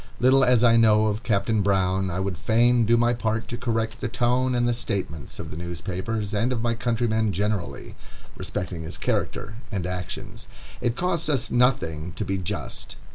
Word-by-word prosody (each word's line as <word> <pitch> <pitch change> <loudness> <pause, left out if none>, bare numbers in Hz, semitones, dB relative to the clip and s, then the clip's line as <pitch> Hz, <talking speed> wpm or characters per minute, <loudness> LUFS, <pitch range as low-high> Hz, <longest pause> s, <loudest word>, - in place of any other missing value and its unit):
Little 130 +2 +5
as 125 -2 +4
I 115 -1 +6
know 110 -1 +5
of 105 0 0
Captain 110 -2 +1
Brown, 95 -1 +1
I 90 +1 -2
would 95 -1 -1
fain 115 +6 +3
do 120 +1 +5
my 120 +1 +3
part 115 -1 -1
to 120 - -3
correct 115 -2 -2
the - - -1
tone 125 +2 +1
and 120 0 +2
the 120 - +2
statements 95 - -4
of - - -7
the - - -6
newspapers, 95 +5 -4
and 115 +5 +1
of 115 -3 -2
my 120 -1 +1
countrymen 115 -2 0
generally, 100 -1 -2 0.4
respecting 90 -2 -4
his 80 - -5
character 110 0 -2
and 95 -5 -2
actions. 90 -1 -6 0.3
It 120 -1 0
costs 170 0 0
us 135 -5 0
nothing 90 - +1
to 105 - -3
be 95 0 -1
just. 95 +3 -5
110 Hz, 185 wpm, -25 LUFS, 95-120 Hz, 0.4 s, I